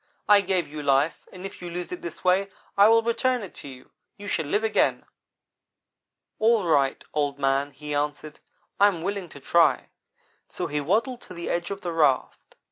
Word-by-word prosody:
'I 205 -1 +7
gave 185 -3 0
you 150 +1 -7
life, 140 +2 +1
and 185 0 -9
if 195 - -9
you 175 - -6
lose 175 +1 -5
it 180 - -6
this 170 - -8
way 190 +2 +2 0.3
I 200 +1 +7
will 225 +1 +5
return 245 +1 0
it 190 - -9
to - - -10
you. 130 -2 -12 0.3
You 205 - -10
shall 160 -6 -1
live 205 +8 0
again!' 220 - +1 1.3
"'All 220 -2 +3
right, 140 -5 +2
Old 145 -2 -1
man,' 135 0 +1
he 150 +1 -7
answered, 150 +1 -3 0.4
'I 200 - +7
am 180 -5 -1
willing 200 -2 -3
to 145 - -12
try'; 150 -1 +2 0.6
so - - -4
he 150 0 -2
waddled 230 - 0
to 180 - -12
the 170 - -4
edge 175 0 -2
of 200 0 -5
the 175 - -3
raft. 150 -5 0
170 Hz, 195 wpm, -25 LUFS, 145-200 Hz, 1.3 s, I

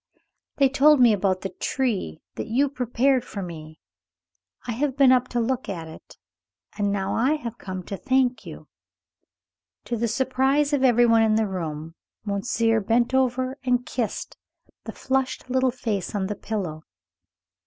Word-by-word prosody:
"They 275 - +4
told 280 +2 +5
me 240 -3 +6
about 190 -2 0
the 195 - -3
tree 195 - -2
that - - -5
you 265 +5 +2
prepared 255 0 +1
for 200 -5 -6
me. 155 -3 -9 0.9
I 245 - -3
have 265 +3 -1
been 270 -2 +6
up 255 -1 +3
to 245 - -2
look 255 +2 -1
at 165 -4 -5
it, 160 - -13 0.6
and 205 -1 0
now 195 -1 -1
I 255 +6 +2
have 240 -6 -7
come 185 -1 -6
to 195 - -6
thank 260 0 +1
you." - - -10 1.2
To 240 - -2
the 235 +1 0
surprise 265 +5 +1
of 275 -2 +2
every 240 -2 +5
one 230 -1 +5
in 220 -1 +3
the 220 0 +2
room, 165 -4 -5 0.3
monsieur 225 +2 +1
bent 235 +4 +1
over 260 +1 0
and 250 -1 +1
kissed 235 -5 -4 0.5
the - - -5
flushed 265 -1 -2
little 260 0 +3
face 220 -6 -3
on 195 -2 0
the 205 +2 -3
pillow. 185 -9 -4
235 Hz, 165 wpm, -24 LUFS, 200-260 Hz, 1.2 s, me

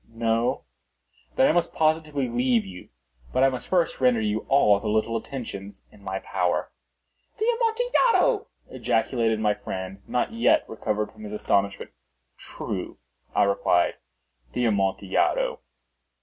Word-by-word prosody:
No? 115 +1 0 0.7
Then - - +5
I - - +4
must 170 +1 0
positively 155 -3 +1
leave 120 -2 +1
you. 90 -2 -11 0.4
But 130 - +2
I 135 - +6
must 130 -2 -5
first 175 -6 +1
render 125 -3 +4
you 105 0 -2
all 105 -7 +5
the 110 - -5
little 110 +2 +1
attentions 105 -5 -6
in 100 - -19
my 95 -1 -3
power." 90 -2 -1 0.7
"The 435 - -1
Amontillado!" 475 -1 +2 0.2
ejaculated 115 -1 0
my 105 -1 +2
friend, 95 -1 -6
not 125 - -1
yet 295 +7 +3
recovered 105 -1 -2
from 110 - -16
his 105 0 -7
astonishment. 100 -1 0 0.4
"True," - - -6 0.4
I - - +5
replied; 100 0 +2 0.6
"the 125 - 0
Amontillado." 95 -3 +1
115 Hz, 135 wpm, -25 LUFS, 100-145 Hz, 0.7 s, I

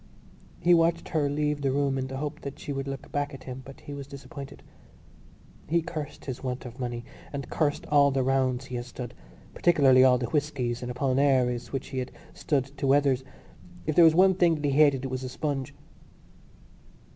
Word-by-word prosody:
He 175 +1 +4
watched 165 0 +2
her 150 -3 +1
leave 150 0 -1
the 135 -1 +1
room 140 0 +1
in 130 -1 -2
the 135 0 -5
hope 150 +2 -4
that 140 -1 -7
she 145 - -5
would 135 0 -4
look 135 0 -6
back 145 0 -2
at 135 - -12
him, 130 0 -7
but 135 +1 -12
he 145 - -8
was 140 -1 -7
disappointed. 140 0 -10 1.0
He 170 +1 +2
cursed 155 -3 -6
his 130 -1 -5
want 125 0 -4
of 120 +1 -9
money 120 -1 -4 0.3
and 140 -1 -6
cursed 145 -2 0
all 145 -1 +5
the 135 -1 0
rounds 130 -1 +1
he 125 -1 -5
had 120 - -5
stood, 125 -1 -7 0.4
particularly 140 -7 +5
all 130 -1 +6
the 120 - -2
whiskies 135 -5 -1
and 125 - -5
Apollinaris 130 -1 +1
which 135 - -4
he 130 - -3
had 125 - -4 0.2
stood 140 -3 -1
to 140 - 0
Weathers. 135 -2 +3 0.6
If 155 - 0
there 175 - +8
was 160 -1 +6
one 190 +2 +6
thing 175 -3 +3
that 150 -1 -4
he 140 - +2
hated 140 -2 +4
it 130 - -4
was 130 0 -3
a 130 - -4
sponge. 140 -2 -3
135 Hz, 205 wpm, -27 LUFS, 130-145 Hz, 1.0 s, there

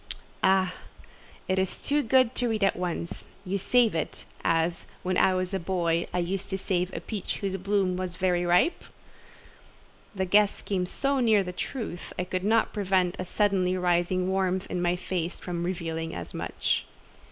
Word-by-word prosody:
"Ah! 190 -1 +4 0.7
it 185 0 +1
is 190 -1 -1
too 295 +1 +3
good 255 -1 +4
to 245 - 0
read 215 -2 0
at 195 - +3
once; 175 -1 -3 0.2
you 195 +2 -1
save 240 +3 +3
it, 160 -2 -3 0.2
as, 165 +1 +1 0.2
when 185 0 0
I 185 +1 +4
was 185 +1 -1
a 195 - 0
boy, 170 -2 0
I 180 - -2
used 180 +2 -1
to 190 - -1
save 185 -1 -1
a - - -4
peach 210 -4 -4
whose 195 -1 -2
bloom 195 -1 +1
was 185 -1 -4
very 180 0 +1
ripe?" 175 - +3 1.3
The 190 -1 0
guess 205 +2 +3
came 185 -3 -1
so 275 +7 0
near 220 -5 +4
the 180 -1 -5
truth, 215 -3 -5
I 180 - 0
could 185 0 -3
not 220 +2 +2
prevent 190 -3 +1
a 185 - -2
suddenly 185 -2 +1
rising 180 +1 +1
warmth 190 -1 0
in 180 - -1
my 175 0 +2
face 180 -1 -3
from 175 -1 -4
revealing 165 -2 -3
as 85 - -6
much. - - -1
185 Hz, 175 wpm, -27 LUFS, 175-200 Hz, 1.3 s, Ah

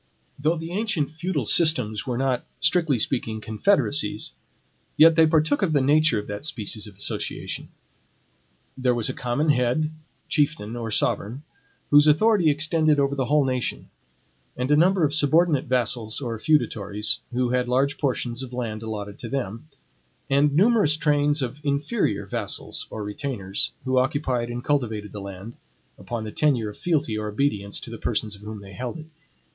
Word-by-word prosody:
Though 155 +4 +2
the 165 +1 -6
ancient 185 -7 -1
feudal 160 -4 -2
systems 125 -8 +1
were 125 -2 -1
not, 130 -1 0 0.2
strictly 150 -1 +2
speaking, 110 -1 -1
confederacies, 110 -1 0 0.7
yet 160 +1 +7
they 160 -1 +6
partook 155 -2 +2
of 170 -5 +1
the 145 - +4
nature 145 -1 +3
of 105 - -3
that 105 +4 -6
species 110 -6 -2
of 100 - -13
association. 100 - -4 1.1
There 125 -2 +1
was 115 -2 0
a - - -2
common 135 +6 -1
head, 140 +3 +2 0.4
chieftain, 145 -7 0
or 115 -1 -4
sovereign, 110 +4 -1 0.5
whose 145 +1 +7
authority 175 +3 +4
extended 155 0 +2
over 140 0 +2
the 135 -2 -1
whole 145 +2 +3
nation; 130 -2 -2 0.7
and 125 +3 -1
a - - +6
number 180 +3 +4
of 145 -1 +2
subordinate 155 0 +3
vassals, 120 -3 0
or 115 -5 -4
feudatories, 105 -7 +1
who 125 0 0
had 125 0 +1
large 140 +3 +1
portions 125 -3 -1
of 130 -1 -8
land 115 -3 -4
allotted 105 -2 -6
to 115 - -7
them, 120 0 -4 0.6
and 140 +1 +3
numerous 195 -5 +4
trains 145 -1 +2
of 135 +4 -6
INFERIOR 140 - 0
vassals 105 -1 -2
or 110 - -5
retainers, 105 -2 -2
who 130 0 +2
occupied 130 -3 -1
and 120 0 -5
cultivated 110 -8 -1
that 105 - -7
land 100 +3 -9 0.4
upon 115 -2 -5
the 110 - -6
tenure 125 -7 +1
of 105 - -11
fealty 150 -10 0
or 110 0 -3
obedience, 105 -3 -1
to - - -9
the - - -7
persons 105 -2 -2
of 100 - -16
whom 105 0 -8
they 100 -1 -12
held 125 - -5
it. 155 - -9
130 Hz, 165 wpm, -24 LUFS, 110-150 Hz, 1.1 s, yet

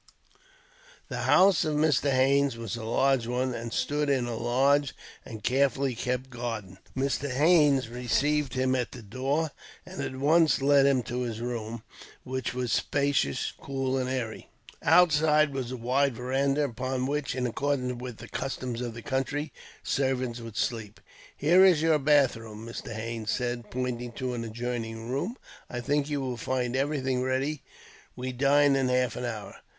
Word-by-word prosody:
The - - -3
house 190 -3 +6
of 155 -2 -1
Mr. 150 -2 +2
Haines 135 0 +3
was 115 -1 -4
a 115 - -6
large 125 +1 +2
one, 125 +1 -1
and 115 0 -5
stood 145 +3 0
in 130 -3 +2
a 120 -1 -3
large 135 +4 +2 0.3
and 110 -3 -9
carefully 135 +1 +2
kept 125 +2 -3
garden. 115 -6 -5 0.2
Mr. 140 +1 0
Haines 145 -2 +4
received 135 +3 0
him 130 0 +1
at 125 -2 -1
the 120 - -9
door, 135 +8 -1 0.3
and - - -7
at 130 - -4
once 155 +3 +4
led 140 0 +5
him 130 -3 +2
to 125 +2 -3
his 115 -3 -3
room, 115 -2 -4 0.4
which 130 -1 -3
was 125 -2 -2
spacious, 140 - 0
cool, 135 -1 -2
and 130 -1 -1
airy. 125 -4 -4 0.3
Outside 155 -3 +4
was 130 -3 -3
a 130 - -5
wide 130 +2 +1
veranda, 135 +4 0
upon 130 0 -2
which, 145 0 -2
in 125 -1 -1
accordance 125 0 -1
with 125 -3 -6
the - - -10
customs 125 -2 -4
of 120 -2 -4
the 115 - -8
country, 145 +3 -2 0.3
servants 130 -3 -1
would 115 -2 -9
sleep. 115 -4 -2 0.4
"Here 175 +6 +5
is 175 -5 +5
your 160 -2 +4
bathroom," 120 -7 +1
Mr. 115 0 -7
Haines 110 0 -4
said, 120 -2 -2
pointing 125 -1 -3
to 130 0 -3
an 120 -1 -3
adjoining 115 0 -4
room. 180 - -2 0.3
"I 120 - -4
think 145 +3 0
you 145 -2 -1
will 130 -2 -3
find 125 +1 -2
everything 135 -2 0
ready. 130 +3 -1 0.5
We 130 +1 -4
dine 140 +2 +4
in 135 -1 +1
half 125 0 +1
an 125 - -4
hour." 110 -4 -6
130 Hz, 165 wpm, -28 LUFS, 120-140 Hz, 0.5 s, house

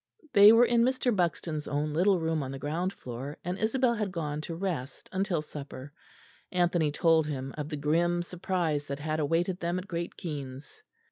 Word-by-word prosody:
They 205 +1 +9
were 230 +2 +7
in 235 -1 +3
Mr. 250 -1 +2
Buxton's 165 -4 -1
own 150 +1 -1
little 185 +3 +3
room 160 -1 0
on 135 - -4
the 135 - -5
ground 165 +7 -2
floor, 130 -2 -7
and 180 +2 -3
Isabel 240 +2 +2
had 210 -4 -2
gone 155 -4 -3
to 165 +1 -5
rest 165 -7 -4
until 185 -4 0
supper. 145 -1 -9 0.6
Anthony 175 -4 +2
told 160 0 +3
him 135 -2 -4
of 150 -1 -4
the 150 - -4
grim 170 +4 +1
surprise 170 -5 -2
that 140 - -3
had 155 +2 -2
awaited 170 +5 0
them 175 0 -1
at 185 +2 -5
Great 170 -1 -4
Keynes. 140 -4 -7
165 Hz, 185 wpm, -29 LUFS, 150-185 Hz, 0.6 s, They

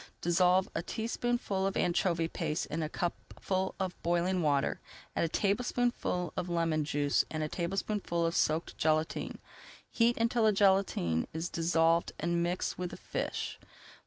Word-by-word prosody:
Dissolve 180 +2 +3
a 165 - -1
teaspoonful 225 -1 -1
of 195 - -2
anchovy 170 -1 +1
paste 160 -2 -2
in 160 +2 -1
a 155 - -2
cupful 185 +2 -3
of 190 -2 -3
boiling 175 +2 +1
water, 145 -3 +1 0.4
add - - +2
a - - -2
tablespoonful 210 -2 0
of 180 - -3
lemon 165 -2 +1
juice 145 -1 +1
and 155 -1 -2
a - - -1
tablespoonful 175 0 -1
of 165 - 0
soaked 155 +2 0
gelatine. 155 0 0 0.5
Heat 235 +1 +3
until 230 0 +2
the 215 - +5
gelatine 190 - +2
is 160 +2 -3
dissolved 165 0 +2
and 170 +1 0
mix 175 +2 -1
with 180 -1 -2
the - - -9
fish. - - -4
175 Hz, 150 wpm, -31 LUFS, 165-195 Hz, 0.5 s, the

